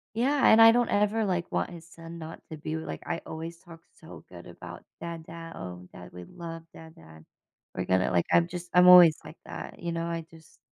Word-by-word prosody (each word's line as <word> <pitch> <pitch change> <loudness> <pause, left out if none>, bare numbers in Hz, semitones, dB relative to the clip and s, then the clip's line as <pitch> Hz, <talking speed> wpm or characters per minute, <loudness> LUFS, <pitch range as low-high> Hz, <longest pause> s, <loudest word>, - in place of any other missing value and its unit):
Yeah. 270 +5 +2
And 225 +1 +7
I 225 - +9
don't 240 +1 +1
ever, 210 +2 +1
like, 180 -3 -2
want - - -1
his 170 -2 -12
son 165 0 -11
not 160 0 -9
to 155 - -8
be 155 +1 -6
w 160 0 -5
like, - - -7
I 165 - -4
always 165 +1 -7
talk 165 -2 -14 0.2
so - - -13
good - - -12
about, - - -11 0.2
"Dad 170 -1 -7
Dad. 165 0 -10
Oh, 90 0 -9
dad, 90 - -12
we 90 0 -9
love 165 - -9
dad 160 0 -14
dad." 80 -1 -16 0.5
We're - - -3
gonna 95 0 +1
like, 85 -1 +1
I'm 170 0 +4
just 175 0 -8
I'm 180 0 +6
always 175 -4 +9
like 160 - -12
that. - - -9
You 170 0 -4
know? 165 0 -3
I 165 -1 -4
just 160 -1 -19
165 Hz, 230 wpm, -27 LUFS, 160-175 Hz, 0.5 s, I